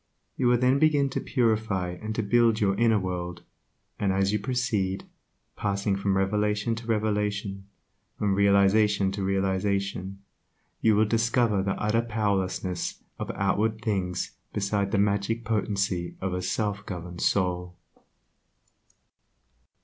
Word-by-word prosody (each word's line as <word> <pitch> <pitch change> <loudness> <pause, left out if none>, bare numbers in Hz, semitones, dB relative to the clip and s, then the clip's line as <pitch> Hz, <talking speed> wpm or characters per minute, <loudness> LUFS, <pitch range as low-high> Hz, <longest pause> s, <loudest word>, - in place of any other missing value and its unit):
You 125 - +1
will 120 0 +5
then 125 +3 +3
begin 145 -3 +3
to - - -1
purify 110 -7 0
and 110 +5 -5
to 110 - 0
build 115 +1 +3
your 100 -2 +2
inner 115 +1 +3
world, 90 -2 -4 0.6
and 100 -2 +1
as 95 +1 +1
you 105 - +1
proceed, 105 -5 -1 0.5
passing 100 0 0
from 100 0 0
revelation 105 +3 +1
to 115 0 -8
revelation, 105 -3 -1 0.5
from 100 -2 +1
realization 100 0 +4
to 100 +1 -4
realization, 95 0 -1 0.6
you 110 -2 +4
will 110 +1 +4
discover 115 -1 +2
the 95 0 -2
utter 105 +2 +2
powerlessness 100 -5 -2 0.2
of - - -4
outward 110 +4 0
things 95 -5 -1 0.2
beside 100 0 0
the 105 - +1
magic 105 +3 0
potency 100 -5 -1
of 95 -1 -2
a 90 - -2
self 100 +2 -2
governed 90 -1 -6
soul. 90 -2 0
100 Hz, 130 wpm, -27 LUFS, 95-110 Hz, 0.6 s, will